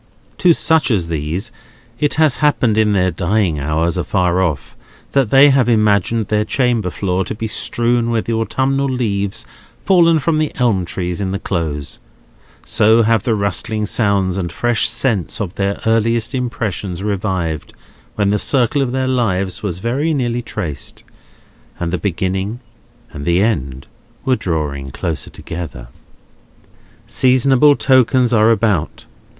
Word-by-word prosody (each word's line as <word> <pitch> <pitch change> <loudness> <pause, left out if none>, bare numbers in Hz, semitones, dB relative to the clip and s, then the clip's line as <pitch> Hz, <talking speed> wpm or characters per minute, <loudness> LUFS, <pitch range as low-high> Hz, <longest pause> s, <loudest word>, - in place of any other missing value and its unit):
To 180 - +5
such 160 -2 +2
as 95 -8 0
these, 80 +7 -3 0.5
it 145 -2 0
has 155 -4 +3
happened 135 -7 +2
in 110 -1 +2
their 95 -2 +2
dying 85 -1 0
hours 80 +5 -1
afar 90 0 0
off, 80 -7 -2 0.4
that 135 -5 +2
they 140 +3 +6
have 130 -3 +2
imagined 105 -1 +2
their 105 0 +1
chamber 120 -4 0
floor 95 0 -1
to 95 - -5
be 110 - -5
strewn 120 +2 0
with 115 -2 -1
the 115 - -2
autumnal 135 +4 0
leaves 100 - -2 0.4
fallen 170 -3 +5
from 155 +1 0
the 155 -1 0
elm 115 -8 +1
trees 90 +2 -4
in 95 - -2
the 100 - -2
Close: 80 -8 -4 0.7
so 110 +2 +4
have 115 0 +2
the 115 -2 0
rustling 105 +2 -1
sounds 100 -4 0
and 85 -2 -3
fresh 120 +4 +1
scents 115 -6 -1
of 95 -5 -3
their 100 0 -2
earliest 115 +2 +1
impressions 105 -7 -3
revived 95 -6 -2 0.4
when 100 -1 +1
the 105 - +1
circle 135 +3 +2
of 130 -2 -1
their 130 0 0
lives 100 -8 -1
was 95 -5 -3
very 135 - -1
nearly 120 -3 -1
traced, 80 - -6 0.8
and 85 0 -3
the 90 - -1
beginning 95 +4 -2 0.5
and 70 -1 -7
the 85 +3 +2
end 70 - -1 0.4
were 130 - +3
drawing 75 - -3
close 80 +3 -3
together. 80 -8 -8 1.2
Seasonable 130 +3 +4
tokens 130 -2 +3
are 110 0 +4
about. 110 -8 0
105 Hz, 145 wpm, -17 LUFS, 90-125 Hz, 1.2 s, they